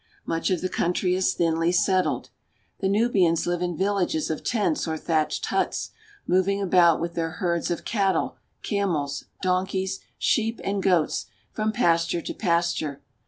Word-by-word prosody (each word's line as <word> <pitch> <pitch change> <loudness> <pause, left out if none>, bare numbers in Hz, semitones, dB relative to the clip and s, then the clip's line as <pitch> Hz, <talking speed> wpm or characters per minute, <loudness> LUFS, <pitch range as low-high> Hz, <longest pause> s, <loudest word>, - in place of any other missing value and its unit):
Much 165 - -1
of 185 -3 0
the 185 - 0
country 180 +1 0
is 185 0 +1
thinly 165 0 +1
settled. 185 +1 +1 0.5
The 190 - 0
Nubians 195 -6 +2
live 175 0 -1
in 175 -2 -2
villages 190 -5 0
of 155 - -4
tents 235 - 0
or 160 0 -2
thatched 155 -1 0
huts, - - -1 0.3
moving 190 +2 +2
about 175 -4 +4
with 170 +1 -3
their 165 -1 -2
herds 170 -2 -1
of 175 - -3
cattle, 195 -3 0 0.3
camels, 160 -9 -1 0.2
donkeys, 190 +1 0 0.2
sheep, 225 0 +1
and 195 0 -1
goats 180 -5 +1 0.3
from 215 0 0
pasture 170 -6 +1
to - - -4
pasture. 170 -6 -1
180 Hz, 150 wpm, -25 LUFS, 165-195 Hz, 0.5 s, about